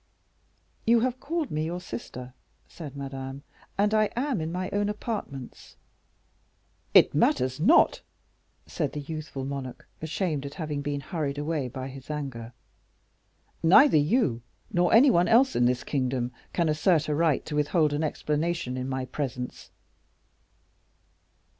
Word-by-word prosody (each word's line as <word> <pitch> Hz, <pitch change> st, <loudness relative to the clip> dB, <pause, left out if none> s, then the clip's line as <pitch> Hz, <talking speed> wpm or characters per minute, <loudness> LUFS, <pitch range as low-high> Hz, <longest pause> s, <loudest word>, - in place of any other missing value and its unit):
"You 235 Hz, 0 st, +4 dB
have 255 Hz, +1 st, -1 dB
called 320 Hz, +1 st, -2 dB
me 155 Hz, +1 st, -1 dB
your 170 Hz, +3 st, -3 dB
sister," 125 Hz, -3 st, -8 dB, 0.3 s
said 145 Hz, -5 st, -9 dB
Madame, 135 Hz, 0 st, -6 dB, 0.3 s
"and 205 Hz, +2 st, +2 dB
I 215 Hz, -1 st, +3 dB
am 250 Hz, -, 0 dB
in 160 Hz, +1 st, -3 dB
my 180 Hz, +1 st, -2 dB
own 205 Hz, 0 st, 0 dB
apartments." 210 Hz, -, -6 dB, 1.2 s
"It -, -, +7 dB
matters 130 Hz, +1 st, +2 dB
not," 225 Hz, -, +5 dB, 0.6 s
said 150 Hz, -5 st, -3 dB
the 150 Hz, -, -4 dB
youthful 150 Hz, -2 st, -6 dB
monarch, 135 Hz, -2 st, -6 dB
ashamed 160 Hz, -2 st, -2 dB
at 140 Hz, -, -10 dB
having 150 Hz, -3 st, -3 dB
been 145 Hz, 0 st, -3 dB
hurried 145 Hz, -2 st, -3 dB
away 150 Hz, -2 st, -1 dB
by 130 Hz, +1 st, -6 dB
his 135 Hz, +1 st, -11 dB
anger; 135 Hz, -6 st, -5 dB, 1.1 s
"neither 195 Hz, -, +7 dB
you, 150 Hz, -, +2 dB, 0.3 s
nor 175 Hz, -1 st, +3 dB
any 255 Hz, +4 st, +7 dB
one 175 Hz, -3 st, +3 dB
else 260 Hz, +4 st, +4 dB
in 120 Hz, -, +3 dB
this 125 Hz, 0 st, +1 dB
kingdom, 130 Hz, -3 st, -1 dB, 0.2 s
can 170 Hz, -2 st, +1 dB
assert 155 Hz, +1 st, +2 dB
a 150 Hz, -, 0 dB
right 155 Hz, -2 st, +2 dB
to 150 Hz, -, -4 dB
withhold 150 Hz, +1 st, +2 dB
an 150 Hz, +2 st, -1 dB
explanation 150 Hz, -2 st, -1 dB
in 130 Hz, +1 st, -3 dB
my 130 Hz, -1 st, -2 dB
presence." 125 Hz, -2 st, -5 dB
150 Hz, 140 wpm, -27 LUFS, 135-180 Hz, 1.2 s, It